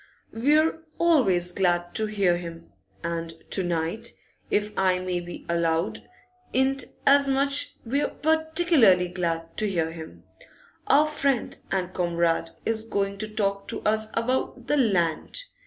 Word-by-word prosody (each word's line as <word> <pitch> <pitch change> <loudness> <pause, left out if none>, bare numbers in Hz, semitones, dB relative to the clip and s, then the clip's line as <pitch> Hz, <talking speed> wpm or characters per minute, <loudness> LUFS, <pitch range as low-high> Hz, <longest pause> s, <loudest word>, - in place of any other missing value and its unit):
'We're 305 +7 +3 0.2
always 200 - +3
glad 175 -2 0
to 220 - -1
hear 195 -5 +2
him, 165 - -9 0.3
and 165 -1 -3 0.2
to 195 - 0
night, 175 +6 -2 0.4
if 210 0 0
I 185 -1 +2
may 180 -1 -2
be 175 0 -9
allowed 170 +1 +1
to - - -10 0.5
'int 265 +1 +2 0.2
as 280 0 +5
much, 275 +1 +1
we're 275 +5 0
particularly 315 - +3
glad 165 -2 -3
to 215 - 0
hear 165 -4 -1
him. 160 -1 -10 0.6
Our 295 +2 +5
friend 280 -5 0 0.2
and 185 -1 -1
comrade 170 -2 0 0.2
is 220 -1 0
going 200 -3 -2
to 215 - -3
talk 200 -2 -2
to - - -4
us 215 0 +1
about 250 +1 -1
the 295 +3 +1
Land. 195 - 0
200 Hz, 140 wpm, -26 LUFS, 175-265 Hz, 0.6 s, as